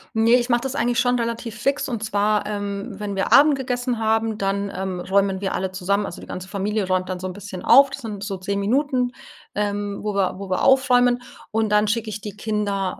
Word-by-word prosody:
Ne, 225 +1 +3
ich 245 0 +1
mache 240 0 +3
das 270 +1 -4
eigentlich 240 -1 +1
schon 245 0 +2
relativ 230 -1 -3
fix 275 +6 0
und 230 -4 -3
zwar, 210 0 +1
ähm, 205 0 -4
wenn 205 -1 -4
wir 195 - -1
Abend 290 +1 +7
gegessen 245 -2 -2
haben, 220 0 0
dann, 200 0 -1
ähm, 185 -1 -3
räumen 195 +1 +1
wir 195 -1 -2
alle 190 0 -2
zusammen 200 +2 0
also, 170 - -7
die - - -11
ganze 185 +1 -7
Familie 205 +1 -1
räumt 185 0 0
dann 185 0 -3
so 185 - -3
'n - - -4
bisschen 200 -2 -8
auf. 275 0 +7
Das 280 - -6
sind 210 -4 -6
so 200 -1 -3
10 200 +2 -3
Minuten, 250 +3 +1 0.4
ähm, 205 -1 -2
wo 210 -1 -2
wir 195 -2 +1
wo 195 -1 -7
wir 185 - 0
aufräumen 245 -2 +4 0.3
und 220 -1 +1
dann 210 0 +3
schicke 220 0 -1
ich 210 0 -5
die 205 -1 -8
Kinder 205 -3 -2
210 Hz, 225 wpm, -22 LUFS, 195-240 Hz, 0.4 s, Abend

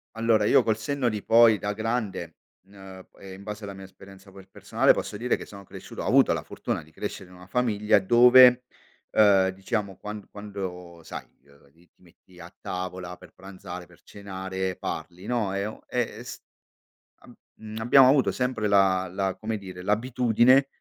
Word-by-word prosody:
Allora 115 -2 +2
io 125 - +4
col 110 -1 0
senno 125 +2 -1
di 105 -2 -5
poi 115 -2 +5
da 105 0 -3
grande 105 -7 -3 0.3
n 100 - -21
uhm, 95 -1 -12
e 95 -1 -10
in 95 +1 -12
base 105 +1 -7
alla 100 -1 -6
mia 95 0 -11
esperienza 95 0 -16
per 95 0 -15
personale - - +2
posso - - -5
dire 125 +3 0
che - - -9
sono 100 -1 -12
cresciuto - - -10
ho - - -5
avuto - - +4
la - - -4
fortuna - - -4
di 80 - -21
crescere 90 +3 -7
in 90 - -15
una 90 +1 -15
famiglia 105 -3 +2
dove, 125 +4 +6 0.5
uhm, 100 -3 +4
diciamo 95 +1 -4
quan 105 -1 -8
quando 90 -4 -8
sai, - - -8 0.2
ehm, 70 0 -23
lì 85 +3 -26
ti - - -38
metti 90 +1 -21
a 85 +1 -12
tavola 90 0 -6
per - - -16
pranzare, 95 -2 -10
per 90 0 -22
cenare, 95 -1 -5
parli, 90 +2 -6
no, 110 -6 -1
e 100 0 -2
o 110 - -7
e - - -2
e - - -9
s - - -9 0.8
abb - - -17 0.2
mhmm, 110 0 -10
abbiamo 125 +3 +6
avuto 135 -1 +3
sempre 125 -4 -2
la 95 -2 +3
la 95 0 -2
come 110 0 -4
dire, 95 -2 -10
l'abitudine 125 +5 +3
100 Hz, 185 wpm, -25 LUFS, 95-110 Hz, 0.8 s, dove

